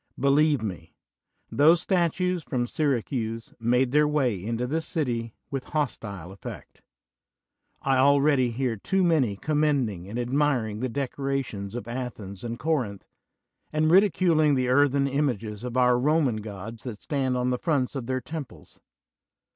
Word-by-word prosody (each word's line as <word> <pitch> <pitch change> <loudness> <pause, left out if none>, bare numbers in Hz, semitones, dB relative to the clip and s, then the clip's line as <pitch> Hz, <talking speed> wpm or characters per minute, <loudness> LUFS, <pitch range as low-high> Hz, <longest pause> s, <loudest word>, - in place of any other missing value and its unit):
Believe 140 -1 +3
me, 90 -6 -6 0.6
those 160 +4 +5
statues 180 -1 0
from 125 -3 -1
Syracuse 120 -5 -2
made 125 +2 +2
their 150 +1 +4
way 130 -11 0
into 115 +3 -2
this 160 +5 -2
city 120 - -2 0.2
with 135 -2 -3
hostile 100 - -3
effect. 95 - -10 1.0
I 135 -1 +2
al 140 +2 +5
ready 140 -4 +3
hear 120 -1 -2
too 190 - 0
many 150 - +2
commending 140 - 0
and 115 - -5
admiring 125 -4 0
the 130 +2 -2
decorations 135 -5 -3
of 120 -2 -5
Athens 115 -6 -6
and 120 0 -4
Corinth, 125 -10 -1 0.7
and 155 +1 +2
ridi 195 +3 +6
culing 155 -5 +3
the 130 -1 0
earthen 140 +1 +3
images 120 -7 -2
of 125 0 -4
our 125 -1 +4
Roman 145 -3 +2
gods 110 +1 -7
that 115 -5 -7
stand 130 -3 0
on 125 0 0
the 125 - -1
fronts 145 -7 0
of 130 -5 -5
their 130 0 -1
temples. 130 - -9
130 Hz, 145 wpm, -26 LUFS, 115-150 Hz, 1.0 s, ridi